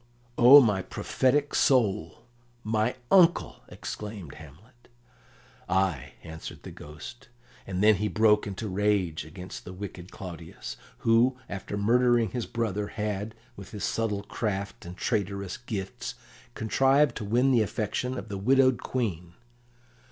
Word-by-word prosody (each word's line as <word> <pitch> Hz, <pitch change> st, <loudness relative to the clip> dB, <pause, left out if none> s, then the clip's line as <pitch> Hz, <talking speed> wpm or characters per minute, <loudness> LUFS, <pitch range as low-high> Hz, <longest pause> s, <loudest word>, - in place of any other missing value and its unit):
"O 130 Hz, +4 st, +10 dB
my 105 Hz, -6 st, +2 dB
prophetic 145 Hz, +8 st, 0 dB
soul! 105 Hz, -, +2 dB, 0.4 s
My 110 Hz, +3 st, 0 dB, 0.2 s
uncle!" 180 Hz, -3 st, +4 dB
exclaimed 105 Hz, -8 st, -7 dB
Hamlet. 95 Hz, -, -16 dB, 0.8 s
"Ay!" 95 Hz, -9 st, 0 dB
answered 80 Hz, 0 st, -9 dB
the -, -, -8 dB
Ghost; 80 Hz, +11 st, -11 dB, 0.4 s
and 95 Hz, +1 st, -2 dB
then 105 Hz, -1 st, +6 dB
he 105 Hz, +3 st, -1 dB
broke 105 Hz, -1 st, +3 dB
into 100 Hz, +2 st, -5 dB
rage 95 Hz, -5 st, 0 dB
against 90 Hz, +4 st, -9 dB
the 90 Hz, -, -9 dB
wicked 90 Hz, -2 st, -8 dB
Claudius, 85 Hz, -3 st, -8 dB, 0.3 s
who, 120 Hz, +3 st, +4 dB
after 100 Hz, +1 st, -5 dB
murdering 120 Hz, +1 st, +3 dB
his 120 Hz, -2 st, -3 dB
brother, 105 Hz, -3 st, -2 dB
had, 105 Hz, 0 st, -4 dB, 0.2 s
with 95 Hz, -1 st, -10 dB
his 105 Hz, -3 st, -7 dB
subtle 105 Hz, -3 st, -1 dB
craft 100 Hz, -4 st, -4 dB
and 90 Hz, +2 st, -9 dB
traitorous 100 Hz, -4 st, -2 dB
gifts, 105 Hz, -5 st, -5 dB, 0.4 s
contrived 135 Hz, +4 st, +3 dB
to 110 Hz, -, -5 dB
win 120 Hz, +6 st, +2 dB
the 120 Hz, -3 st, +4 dB
affections 120 Hz, +4 st, -2 dB
of -, -, -6 dB
the 100 Hz, -2 st, -5 dB
widowed 130 Hz, +3 st, +3 dB
Queen. 90 Hz, -9 st, -3 dB
105 Hz, 130 wpm, -27 LUFS, 95-120 Hz, 0.8 s, O